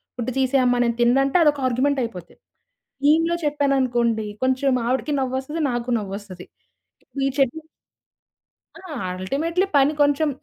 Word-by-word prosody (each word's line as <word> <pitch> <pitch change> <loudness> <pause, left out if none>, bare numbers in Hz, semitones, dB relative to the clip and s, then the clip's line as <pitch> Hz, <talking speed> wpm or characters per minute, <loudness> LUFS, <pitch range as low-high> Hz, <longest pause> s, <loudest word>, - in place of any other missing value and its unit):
Food 250 +1 -3
తీసేయమ్మ 255 -2 +2
నేను 235 -1 0
తిన్నంటే 270 +6 +3
అదొక 290 -2 +2
argument 265 +3 +1
అయిపోద్ది. 180 -7 -8 0.7
మీమ్‌లో 330 +3 +3
చెప్పాను 285 -1 +1
అనుకోండి, 235 -3 0 0.2
కొంచెం 260 0 +1
ఆవిడకి 265 +4 -1
నవ్వొస్తది 265 +5 -3
నాకు 240 +1 -3
నవ్వొస్తది. 195 -2 -8 0.6
ఇప్పుడు 275 -1 -5
ఈ - - +1
చట్నీ 275 +4 0 1.2
ఆ! 370 -4 -10 0.3
అల్టిమేట్లి 330 - -1
పని 280 +2 +4
కొంచెం 290 +2 +2
265 Hz, 125 wpm, -22 LUFS, 240-290 Hz, 1.2 s, పని